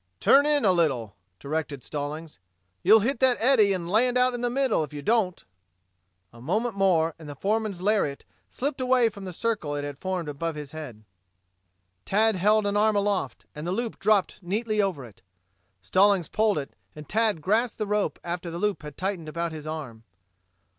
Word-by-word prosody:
"Turn 280 - +5
in 295 -5 +3
a 190 - +5
little," 135 - 0 0.2
directed 145 -2 -4
Stallings. 150 - -6 0.4
"You'll 220 - +6
hit 240 +3 -1
that 260 -2 +4
eddy 225 -4 +4
and 180 -3 -2
land 240 +6 +2
out 250 0 +3
in 245 - -4
the 245 - 0
middle, 260 -8 +1
if 150 - -8
you 145 -1 -7
don't." 210 - 0 0.9
A 115 - -14
moment 215 - -1
more 175 -5 +2
and 155 -2 -10
the 145 - -7
foreman's 205 +1 -1
lariat 200 -9 0 0.2
slipped 270 0 -3
away 255 -2 +3
from 200 -2 -10
the 185 - -5
circle 180 -7 -2
it 145 - -3
had 145 -1 -6
formed 185 -3 -3
above 155 +3 -3
his 150 -2 -7
head. 135 -9 -9 1.0
Tad 220 +2 +2
held 210 +3 +3
an 200 0 0
arm 215 +1 +3
aloft, 200 - -1
and 150 +3 -6
the - - -1
loop 230 +4 -3
dropped 205 -2 +1
neatly 215 +4 -1
over 180 -10 -2
it. 110 -4 -16 0.6
Stallings 190 - +3
pulled 215 -3 +1
it 140 -2 -5 0.2
and 150 -1 -10
Tad 220 -3 +1
grasped 215 +8 0
the 215 - -2
rope 210 0 -1
after 175 0 -4
the 170 - -5
loop 210 +2 -1
had 150 -1 -10
tightened 185 -4 -3
about 170 +1 -3
his 155 -1 -8
arm. 145 -8 -6
190 Hz, 190 wpm, -26 LUFS, 155-220 Hz, 1.0 s, You'll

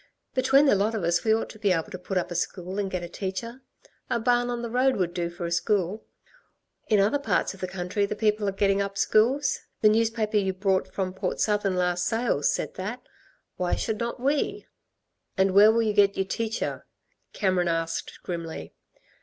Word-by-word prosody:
Between 270 +2 +4
the 275 - +5
lot 205 +3 +1
of 210 - -2
us 170 +1 +1
we 220 - +2
ought 220 +1 +1
to 215 - -14
be 205 -3 +2
able 180 +4 -1
to 185 - -6
put 185 +1 -3
up 180 - -1
a - - -4
school 180 +2 -3
and 200 -1 -1
get 185 -2 -3
a - - -4
teacher. 195 +8 -5 0.5
A 235 - +1
barn 245 +1 +2
on 240 -1 -3
the 235 - -3
road 255 +2 +3
would 175 -3 -1
do 175 -1 -2
for 175 0 -6
a 170 - -3
school. 195 +3 0 0.8
In 210 -2 +3
other 210 +9 +3
parts 280 - 0
of 195 - -14
the 185 - -3
country 185 +2 -2
the 210 - -3
people 210 -1 +1
are - - -1
getting 195 0 +1
up 200 0 -3
schools. 245 +8 +2 0.2
The 215 - +6
newspaper 220 -1 +1
you 190 -2 +1
brought 190 0 0
from 185 -2 -2
Port 190 - -3
Southern 205 -3 +1
last 180 -1 0
sales 225 -11 +1
said - - -3
that. 210 +7 -5 0.5
Why 180 -1 0
should 220 -2 -2
not 235 +1 -3
we?" 280 +3 0 0.7
"And 190 0 +3
where 205 +3 +7
will 230 +1 +2
you 215 -1 0
get 200 -1 +4
y'r 195 - +1
teacher," 225 +3 -3 0.5
Cameron 185 -3 +1
asked 165 0 -3
grimly. 170 -3 -6
200 Hz, 205 wpm, -26 LUFS, 185-225 Hz, 0.8 s, where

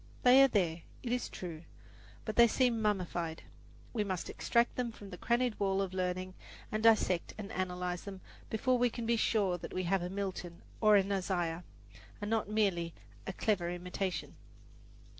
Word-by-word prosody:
They 255 +2 +8
are 275 - +8
there, 175 -8 0 0.2
it 240 - -3
is 245 0 -1
true; 165 -4 -7 0.6
but 215 - -3
they 235 0 +8
seem 235 -1 +2
mummified. 175 -6 -1 0.5
We 220 -4 +1
must 185 -4 -3
extract 235 0 +1
them 245 -2 -1
from 205 -3 -11
the 180 - -7
crannied 240 -1 +1
wall 195 -1 +1
of 195 -2 -1
learning 185 0 -2 0.4
and 215 - -1
dissect 215 -6 +3
and 205 -2 -6
analyze 180 -1 -3
them 195 -2 -7 0.3
before 250 +3 +1
we 245 0 +4
can 235 0 -5
be 235 +1 +3
sure 200 -5 +1
that - - -8
we 185 - 0
have 185 +1 +1
a 175 - -3
Milton 190 -3 -5 0.2
or 215 -1 +6
an 200 0 +3
Isaiah, 180 -3 -1 0.6
and 205 +1 -4
not 220 -2 0
merely 190 -6 +1 0.3
a 190 - -3
clever 180 -4 0
imitation. 180 +1 -4
195 Hz, 175 wpm, -33 LUFS, 180-220 Hz, 0.6 s, They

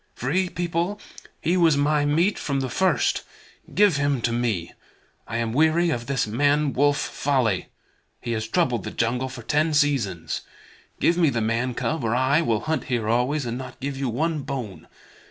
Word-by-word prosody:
Free 180 +9 0
People, 175 +4 -2 0.4
he 170 - +1
was 165 -5 +4
my 145 +1 +2
meat 165 +8 +2
from 140 -2 -1
the 130 -2 -3
first. 190 +8 +1 0.5
Give 205 -7 +4
him 140 -2 +1
to 115 - 0
me. 115 -8 -1 0.5
I 115 - -3
am 115 -1 -1
weary 160 +4 +3
of 120 -4 -3
this 135 -2 0
man 145 +6 +1
wolf 145 +1 +3
folly. 125 -9 0 0.5
He 120 - -5
has 110 -1 -2
troubled 125 - +1
the - - -4
jungle 125 +3 -1
for 120 -2 -9
ten 150 +4 +1
seasons. 110 - 0 0.6
Give 170 - +3
me 165 -4 +4
the 120 -3 -1
man 115 +3 -1
cub, 160 +1 -2
or 115 +1 +1
I 130 +5 +3
will 115 -8 0
hunt 155 +3 -2
here 120 -4 -1
always, 125 +5 +1
and 120 +1 -3
not 130 - -9
give 140 0 -3
you 135 -1 -2
one 155 +6 -1
bone. 130 -8 -6
135 Hz, 180 wpm, -24 LUFS, 120-155 Hz, 0.6 s, was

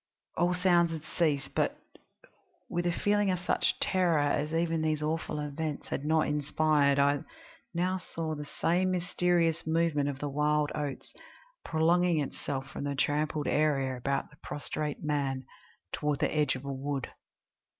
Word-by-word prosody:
All 175 +1 +2
sounds 175 -2 +4
had 160 -2 -5
ceased, 150 -5 0
but, - - 0 0.9
with 175 0 0
a - - +2
feeling 205 +3 +2
of 185 - +1
such 175 - 0
terror 180 -4 +2
as 145 +1 +1
even 165 0 +1
these 155 -1 0
awful 155 0 -2
events 150 +1 -4
had 145 - -3
not 160 0 +3
inspired, 150 -1 +2
I 140 0 +4 0.6
now 185 +2 +1
saw 165 -3 -4
the 150 -1 -6
same 180 +5 +1
mysterious 175 -2 +1
movement 160 -3 +2
of 140 - -4
the 145 - -3
wild 150 +1 +1
oats 145 -3 -4 0.5
prolonging 170 +2 +3
itself 135 -1 -3
from - - -5
the 140 0 -2
trampled 150 +1 0
area 140 -4 +2
about 140 +4 -2
the 150 - -19
prostrate 150 +1 -4
man 140 -3 -1 0.5
toward 150 -1 0
the - - 0
edge 150 -4 +2
of 130 +1 -8
a 140 - -3
wood. 135 0 -3
150 Hz, 155 wpm, -30 LUFS, 145-170 Hz, 0.9 s, sounds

